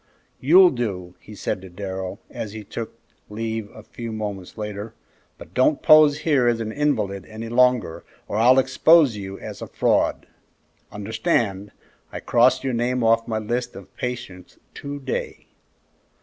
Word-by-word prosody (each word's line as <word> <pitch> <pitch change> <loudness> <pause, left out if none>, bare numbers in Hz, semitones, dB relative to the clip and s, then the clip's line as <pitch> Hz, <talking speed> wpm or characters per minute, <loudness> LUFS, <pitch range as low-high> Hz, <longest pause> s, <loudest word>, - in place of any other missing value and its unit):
"You'll 180 +7 +6
do," 95 -8 -4
he 105 - -13
said 95 - -3
to 95 - -11
Darrell, 95 +1 -6
as 105 -2 -6
he 110 -1 -7
took 110 +3 -7 0.3
leave 110 0 -4
a 110 - -13
few 115 +1 -8
moments 105 -4 -6
later, 105 +1 -6 0.4
"but - - -13
don't 140 +3 +2
pose 150 -1 +6
here 140 -6 +2
as 120 -1 +2
an 110 -1 -3
invalid 110 -9 -1
any 110 +1 -7
longer, 125 -7 +2 0.2
or 105 - -3
I'll 125 +4 +5
expose 135 +1 +4
you 95 -1 -7
as - - -9
a - - -6
fraud. - - +1 0.7
Understand, 105 -1 -1 0.4
I - - -6
cross 120 +2 +3
your 135 -2 -1
name 120 +1 0
off 115 0 +3
my 110 -2 -2
list 120 +3 -3
of 95 - -12
patients 120 -8 -6 0.2
to 145 0 -7
day." 135 -1 -5
115 Hz, 155 wpm, -23 LUFS, 105-125 Hz, 0.7 s, You'll